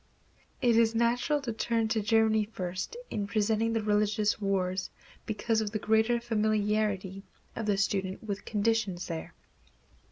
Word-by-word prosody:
It 235 -2 +4
is 230 0 +3
natural 245 +6 +2
to 240 -4 -3
turn 225 0 0
to 220 -1 +1
Germany 220 0 +3
first 185 - -5
in 205 -1 -2
presenting 220 +2 +1
the 225 -1 0
religious 210 0 +1
wars 185 -2 0 0.4
because 220 +1 0
of 215 - -2
the 215 - -2
greater 220 +3 +2
familiarity 210 -4 0 0.3
of 225 - -4
the 205 -2 +2
student 195 0 -1
with 200 -2 -4
conditions 210 -4 0
there. 165 -2 -6
215 Hz, 140 wpm, -29 LUFS, 200-225 Hz, 0.4 s, It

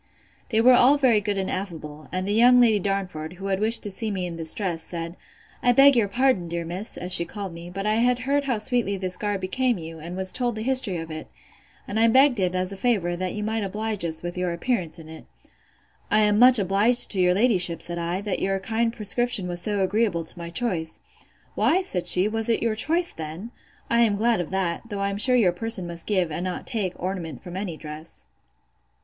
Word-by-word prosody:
They 220 - +1
all 250 +2 +6
were - - +1
very 245 -7 +3
good 205 -1 -2
and 190 -1 -2
affable; 155 -6 -6
and 185 +1 -3
the 205 - 0
young 245 +3 +6
Lady 225 -4 +4
Darnford, 185 -5 -3
who 190 +2 -10
had 195 -1 -1
wished 220 +2 +3
to 205 - -3
see 215 +3 -2
me 190 -3 -3
in 175 -1 -6
this 160 -1 +2
dress, 180 -6 -3
said, 165 0 -6 0.5
I 245 - +3
beg 275 +2 +6
your 225 -4 +2
pardon, 240 -5 +1
dear 170 0 -4
miss, 180 +6 -5
as 180 +1 -1
she 170 - +4
called 195 +1 -7
me; 170 +1 -9
but 195 +3 -5
I 215 +1 +1
had 245 +1 +2
heard 280 +3 -1
how 250 -4 0
sweetly 215 -2 -1
this 185 -1 -2
garb 205 -2 -3
became 245 +5 0
you, 165 -1 -9
and 170 +3 -7
was 190 0 +1
told 245 -3 -2
the 220 - -4
history 255 -7 +1
of 165 0 -7
it; 155 0 -7 0.6
and 215 - -2
I 230 - +5
begged 260 0 +4
it, 185 -1 0
as 185 +1 -2
a 195 - -7
favour, 190 -6 0
that 185 +2 -4
you 210 - -4
might 220 0 -2
oblige 210 0 -2
us 160 -1 -4
with 175 0 -5
your 180 -1 -1
appearance 175 -3 -2
in 160 -2 -12
it. 160 0 -11 0.8
I 215 - +3
am 210 0 +3
much 250 +1 +8
obliged 205 +5 +4
to 190 - 0
your 180 0 +3
ladyship, 185 -6 +2
said 175 0 -5
I, 170 +3 -3
that 205 -2 -3
your 195 0 0
kind 225 +3 -1
prescription 215 -2 0
was 175 -1 -5
so 205 0 -1
agreeable 190 -3 0
to 170 - -2
my 170 0 -6
choice. 170 -4 -3 0.5
Why, 370 +4 +2
said 180 - -3
she, 180 +2 +5
was 225 +1 -1
it 225 - +1
your 230 -1 +1
choice 330 +10 0
then?—I 185 +8 -5
am 220 -3 +3
glad 225 -1 +1
of 170 - -6
that: 185 -3 -2
though 205 -2 -5
I 200 0 0
am 200 - -4
sure 250 +4 +3
your 210 -8 +4
person 220 0 -1
must 170 -1 -5
give, 185 -6 0
and 160 +3 -4
not 185 -1 -4
take, 200 -6 -2
ornament 175 -5 -5
from 180 -1 -9
any 185 -4 -4
dress. 155 - -9
195 Hz, 230 wpm, -24 LUFS, 175-225 Hz, 0.8 s, much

